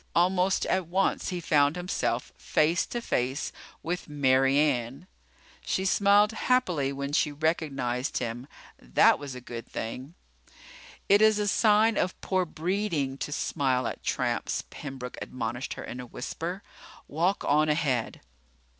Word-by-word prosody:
Almost 185 Hz, +2 st, +2 dB
at 185 Hz, -3 st, 0 dB
once 190 Hz, +3 st, 0 dB
he 180 Hz, -2 st, -3 dB
found 145 Hz, -2 st, +3 dB
himself 180 Hz, +1 st, -2 dB
face 165 Hz, +3 st, +1 dB
to 240 Hz, -, -4 dB
face 130 Hz, -, -1 dB, 0.3 s
with 175 Hz, 0 st, -3 dB
Mary 135 Hz, -1 st, +3 dB
Ann. 135 Hz, 0 st, 0 dB, 0.6 s
She 190 Hz, -, -1 dB
smiled 205 Hz, +2 st, +4 dB
happily 185 Hz, -, +1 dB
when 140 Hz, +1 st, -4 dB
she 150 Hz, 0 st, +2 dB
recognized 140 Hz, -5 st, -1 dB
him. 120 Hz, +2 st, -4 dB, 0.3 s
That -, -, +4 dB
was 140 Hz, -3 st, -7 dB
a 125 Hz, -, -8 dB
good 120 Hz, -1 st, -8 dB
thing. 130 Hz, +8 st, -6 dB, 0.9 s
"It 205 Hz, +1 st, +5 dB
is 215 Hz, -1 st, +5 dB
a 210 Hz, -1 st, 0 dB
sign 215 Hz, +1 st, +4 dB
of 185 Hz, -, -1 dB
poor 185 Hz, -1 st, 0 dB
breeding 160 Hz, -5 st, -2 dB
to -, -, -4 dB
smile 130 Hz, -4 st, 0 dB
at -, -, -4 dB
tramps," -, -, -1 dB
Pembroke 130 Hz, -3 st, -7 dB
admonished 120 Hz, +1 st, -4 dB
her -, -, -7 dB
in 125 Hz, -, -7 dB
a 125 Hz, -, -7 dB
whisper. 175 Hz, +10 st, -5 dB, 0.4 s
"Walk 175 Hz, +6 st, 0 dB
on 155 Hz, +2 st, +3 dB
ahead." 140 Hz, -6 st, 0 dB
150 Hz, 140 wpm, -28 LUFS, 130-185 Hz, 0.9 s, It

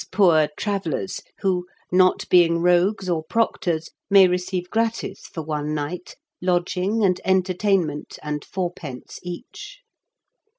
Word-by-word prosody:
67 -, -, -12 dB
poor 165 Hz, -6 st, +5 dB
travellers 195 Hz, -3 st, -2 dB, 0.2 s
who, 180 Hz, -2 st, 0 dB, 0.2 s
not 185 Hz, 0 st, +3 dB
being 170 Hz, -2 st, +5 dB
rogues 180 Hz, +3 st, +2 dB
or 165 Hz, -3 st, 0 dB
proc 225 Hz, +8 st, 0 dB
tors, 165 Hz, -2 st, -2 dB, 0.2 s
may 195 Hz, -2 st, +8 dB
receive 180 Hz, 0 st, -2 dB
gratis 225 Hz, 0 st, -2 dB
for 160 Hz, -, -6 dB
one 150 Hz, 0 st, -2 dB
night 155 Hz, +5 st, -5 dB, 0.3 s
lodging 180 Hz, +4 st, 0 dB
and 180 Hz, -2 st, +1 dB
entertainment 185 Hz, -4 st, +1 dB
and 150 Hz, -1 st, -3 dB
fourpence 175 Hz, -8 st, -6 dB
each." 230 Hz, -, -9 dB
180 Hz, 125 wpm, -23 LUFS, 165-190 Hz, 0.3 s, may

